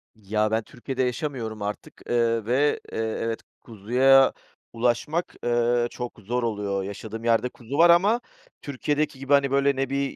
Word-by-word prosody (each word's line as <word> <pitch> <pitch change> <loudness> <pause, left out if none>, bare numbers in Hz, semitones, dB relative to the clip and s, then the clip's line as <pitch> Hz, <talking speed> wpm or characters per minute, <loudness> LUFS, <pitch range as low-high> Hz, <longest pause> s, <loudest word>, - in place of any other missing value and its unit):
Ya, 105 +1 -1
ben 110 0 +1
Türkiye'de 130 +3 -4
yaşamıyorum 125 -5 -3
artık, 105 +1 -6
eee, 115 -2 +1
ve, 135 +5 +2
eee, - - -5
evet 115 0 -2 0.2
kuzuya 125 +5 +4 0.4
ulaşmak, 125 +8 -1
eee, 120 0 +2
çok 125 -2 -7
zor 120 +4 -2
oluyor. 100 -3 -2
Yaşadığım 110 +3 -7
yerde 115 +2 +2
kuzu 125 +3 -7
var 170 +1 +7
ama 200 +8 +4 0.4
Türkiye'deki 145 +1 -2
gibi, 135 +1 0
hani, 140 -1 +4
böyle, 140 0 +3
ne 135 0 -1
bir 140 0 -2
120 Hz, 155 wpm, -25 LUFS, 110-140 Hz, 0.4 s, var